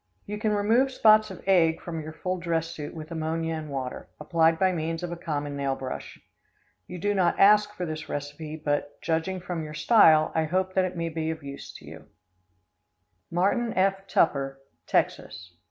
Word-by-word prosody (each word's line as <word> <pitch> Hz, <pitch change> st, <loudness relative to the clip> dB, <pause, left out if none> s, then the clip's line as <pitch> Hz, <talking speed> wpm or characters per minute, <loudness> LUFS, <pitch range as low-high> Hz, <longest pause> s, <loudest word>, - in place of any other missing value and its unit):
] -, -, -42 dB
You 210 Hz, +1 st, -5 dB
can 215 Hz, 0 st, 0 dB
remove 220 Hz, +6 st, +3 dB
spots 215 Hz, -3 st, +5 dB
of 190 Hz, -, -10 dB
egg 170 Hz, -4 st, +3 dB
from 165 Hz, -2 st, -5 dB
your 155 Hz, +1 st, -7 dB
full 185 Hz, +3 st, -3 dB
dress 165 Hz, -1 st, -1 dB
suit 150 Hz, -2 st, -7 dB
with 155 Hz, 0 st, -8 dB
ammonia 165 Hz, 0 st, -2 dB
and 155 Hz, -1 st, -5 dB
water, 130 Hz, -2 st, -5 dB
applied 160 Hz, +1 st, +2 dB
by 185 Hz, +2 st, +3 dB
means 165 Hz, 0 st, -3 dB
of 175 Hz, -, -4 dB
a -, -, -3 dB
common 145 Hz, -3 st, -4 dB
nail 140 Hz, -1 st, -1 dB
brush. 130 Hz, -1 st, -7 dB, 0.7 s
You 180 Hz, -, -7 dB
do 205 Hz, +4 st, 0 dB
not 180 Hz, -3 st, +1 dB
ask 210 Hz, +1 st, +6 dB
for 180 Hz, -, -3 dB
this 155 Hz, -1 st, -6 dB
recipe, 145 Hz, +2 st, -5 dB
but, 145 Hz, -2 st, -2 dB
judging 165 Hz, +3 st, -1 dB
from 175 Hz, -2 st, -4 dB
your 155 Hz, 0 st, -7 dB
style, 155 Hz, -3 st, +5 dB
I 160 Hz, -1 st, +1 dB
hope 185 Hz, +3 st, -1 dB
that 185 Hz, -1 st, +2 dB
it 180 Hz, -1 st, -5 dB
may 165 Hz, 0 st, -2 dB
be 160 Hz, 0 st, -3 dB
of 160 Hz, -2 st, -5 dB
use 140 Hz, 0 st, -8 dB
to -, -, -12 dB
you. -, -, -12 dB, 1.2 s
Martin 200 Hz, +7 st, +1 dB
F. 195 Hz, +1 st, +1 dB
Tupper, 135 Hz, -6 st, +1 dB, 0.3 s
Texas. 90 Hz, -1 st, -1 dB
165 Hz, 190 wpm, -26 LUFS, 155-185 Hz, 1.2 s, ask